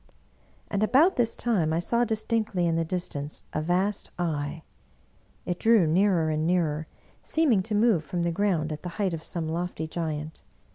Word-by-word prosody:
And 200 - -2
about 275 - +4
this 235 -2 +1
time 195 -10 +1
I 160 - +1
saw 235 +8 +1
distinctly 220 -4 -1
in 165 -1 +1
the 165 - +1
distance 160 -4 -4
a 155 - -1
vast 185 +5 0
Eye. 160 -2 -2 0.8
It 175 -1 -3
drew 225 -5 +5
nearer 170 0 +2
and 155 +1 0
nearer, 160 -3 0 0.3
seeming 285 -11 +2
to 210 +3 -2
move 210 -6 +3
from 175 +3 -3
the 170 - +1
ground 170 -4 0
at 155 - -5
the 180 - -5
height 195 -4 0
of 165 - -4
some 165 -1 -3
lofty 165 -1 -3
g^ant. 155 -2 -4
175 Hz, 175 wpm, -27 LUFS, 160-210 Hz, 0.8 s, drew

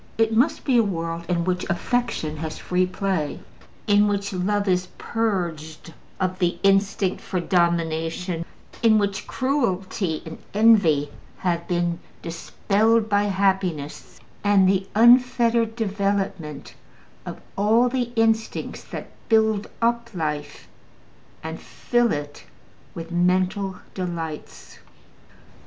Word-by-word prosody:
It 225 0 +2
must 280 +8 +2
be 260 -4 +3
a - - +5
world 170 -3 -3
in 170 -1 +1
which 180 0 -1
affection 175 -5 -1
has 155 0 -5
free 180 0 0
play, 185 -5 -2 0.5
in 205 0 +4
which 200 -1 -1
love 200 +3 0
is 180 -1 +1
purged 170 -8 -3 0.3
of 185 -1 -1
the 175 -1 +1
instinct 195 -1 +2
for 185 - -3
domination, 170 0 0 0.4
in 225 -2 +5
which 200 -2 -1
cruelty 195 - -1
and 160 0 -8 0.2
envy 200 -10 +4 0.3
have 170 -2 -1
been 175 -1 0 0.2
dispelled 210 +6 +1
by 205 0 +2
happiness 190 -7 -1 0.2
and 200 -2 +4
the 190 0 +1
unfettered 235 -1 +4
development 195 - -2 0.5
of - - -7 0.2
all 220 +5 +3
the 245 -1 -1
instincts 225 -1 0
that - - -8 0.2
build 220 -2 +2
up 235 0 +1
life 150 -3 -4 0.8
and - - -5
fill 240 -2 0
it 145 0 -5 0.5
with 165 0 -7
mental 185 +2 +1 0.2
delights. 170 -4 -6
190 Hz, 115 wpm, -23 LUFS, 170-220 Hz, 0.8 s, a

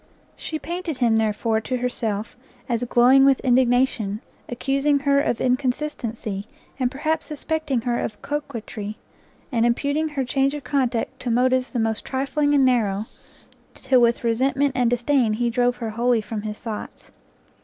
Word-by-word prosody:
She 315 - -4
painted 335 -1 -4
him, 235 -3 +3
therefore, 220 +1 0
to 255 +3 -2
herself, 230 -4 -3 0.3
as 235 0 -1
glowing 250 +3 +5
with 270 -1 +5
indignation, 245 -4 +2 0.3
accusing 275 +4 +1
her 280 0 +3
of 240 -5 -1
inconsistency, 250 -6 -2 0.3
and 250 -1 +2
perhaps 310 +4 -2
suspecting 300 -3 -2
her 240 0 -1
of 215 - -4
coquetry, 225 -7 -5 0.5
and 230 -3 +1
imputing 285 +6 +1
her 275 -3 -2
change 275 +2 +1
of 295 - -6
conduct 265 -2 -1
to 250 - -4
motives 255 +2 +2
the 245 - -3
most 225 -1 -1
trifling 290 +2 0
and 275 -2 +5
narrow, 215 -5 +1 0.7
till 255 -2 +2
with 235 0 +2
resentment 265 +4 +1
and 250 -2 +2
disdain, 245 -1 +2
he 235 +2 0
drove 245 +1 +2
her 230 -2 -4
wholly 235 +1 +2
from 215 0 -5
his 210 0 -5
thoughts. 220 -3 -7
250 Hz, 155 wpm, -23 LUFS, 230-275 Hz, 0.7 s, glowing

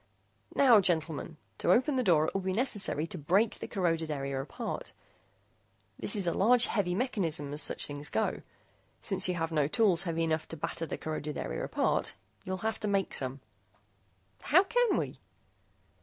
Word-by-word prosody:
"Now, 245 -7 +6
gentlemen, 160 -3 -1 0.2
to 175 - +2
open 260 +8 +3
the 255 - +2
door 170 -9 +4
it - - -3
will 195 - -1
be 190 0 -2
necessary 205 - 0
to 170 +1 -7
break 195 +9 +1
the - - -5
corroded 165 -5 -1
area 140 -2 -2
apart. 135 - -6 1.1
This 205 - +3
is 200 -3 0
a 170 - +1
large 240 +4 +5
heavy 180 -5 0
mechanism, 170 - -1
as 150 - 0
such - - +2
things 145 0 -4
go. - - -1 0.6
Since - - +1
you 180 - 0
have 165 -1 -2
no 150 -3 +2
tools 185 0 +2
heavy 165 -3 -1
enough 160 -1 -1
to 165 - -7
batter 165 +2 -4
the - - -4
corroded 155 -1 -4
area - - -4
apart, - - 0 0.3
you'll 185 0 -3
have 220 - -1
to 210 - -2
make 195 -1 0
some." 130 0 -1 1.0
"How 355 +6 +6
can 485 +2 +2
we?" - - -3
175 Hz, 175 wpm, -30 LUFS, 155-210 Hz, 1.1 s, Now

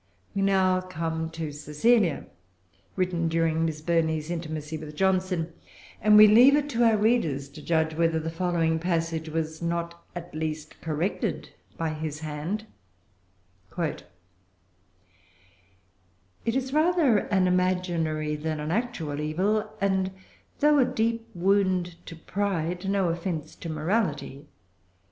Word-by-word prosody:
We 200 - -1
now 190 -1 +3
come 160 -3 -3
to 160 -2 -5
Cecilia, 150 +6 +1 0.7
written 180 -3 0
during 165 0 +1
Miss 155 -2 -3
Burney's 160 -1 0
intimacy 155 -2 -4
with 150 -1 -8
Johnson; 185 -2 0 0.5
and 210 0 +6
we 215 - +11
leave 240 +7 +7
it 290 0 0
to 240 -3 +1
our 225 -2 +5
readers 205 - +1
to 150 +2 -11
judge 160 0 +1
whether 165 0 +1
the 160 +1 -4
following 165 -2 0
passage 165 -2 -1
was 160 0 -3
not 170 0 -3
at 175 -2 -7
least 155 0 -5
corrected 165 +4 -2 0.3
by 165 -1 -1
his 155 -1 -5
hand:— 160 +8 -4 1.1
"It 165 -4 -2 2.4
is 260 +3 0
rather 310 - +4
an 190 -2 +1
imaginary 175 -4 0
than 155 +1 -3
an 150 +1 -3
actual 175 -10 -2
evil, 190 +8 0
and 190 -1 +1 0.5
though 295 0 +5
a 260 - +5
deep 230 0 -1
wound 180 -2 +1
to 165 - -7
pride, 180 0 -2
no 195 -3 +2
offence 165 -2 -3
to 170 - -7
morality. 155 -4 -1
170 Hz, 125 wpm, -27 LUFS, 160-195 Hz, 2.4 s, we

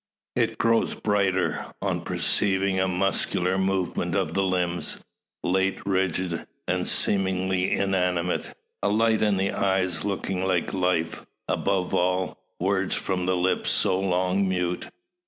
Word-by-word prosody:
It - - +1
grows 115 0 +2
brighter, 100 -3 +1 0.2
on - - -1
perceiving 95 -1 +1
a 95 - +2
muscular 95 0 0
movement 95 -2 0
of 80 - 0
the 95 - +1
limbs, 90 -2 0 0.5
late 95 +1 +1
rigid 95 -3 -1 0.2
and - - 0
seemingly 95 -1 +1
inanimate, 90 -2 0 0.2
a - - +1
light 110 +1 +3
in 105 -2 +3
the 95 +1 +1
eyes 95 -4 0
looking 95 -2 -2
like 95 -1 0
life; 90 -3 0 0.2
above 95 -2 0
all, 90 +1 0 0.2
words 95 +1 +1
from 90 -2 -2
the 95 - +2
lips 90 +1 +1
so 95 - +2
long 95 +1 +1
mute. 90 -1 -1
95 Hz, 130 wpm, -25 LUFS, 90-95 Hz, 0.5 s, light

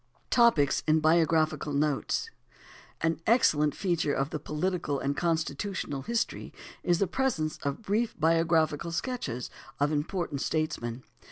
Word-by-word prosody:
Topics 230 - +4
and 155 +1 +4
Biographical 155 -2 +2
Notes. 150 - 0 0.7
An 165 0 0
excellent 150 - +3
feature 170 -6 0
of 135 +2 -1
the 155 - -3
political 150 0 -2
and 140 +1 -1
constitutional 165 -2 -2
history 230 +8 -2 0.3
is 175 -1 +2
the 195 - +2
presence 190 -9 -1
of 140 +10 -3
brief 215 +3 -1
biographical 165 0 +2
sketches 165 - -3 0.3
of 145 +1 +2
important 150 -1 -2
statesmen. 130 -6 -2
160 Hz, 120 wpm, -29 LUFS, 145-180 Hz, 0.7 s, Topics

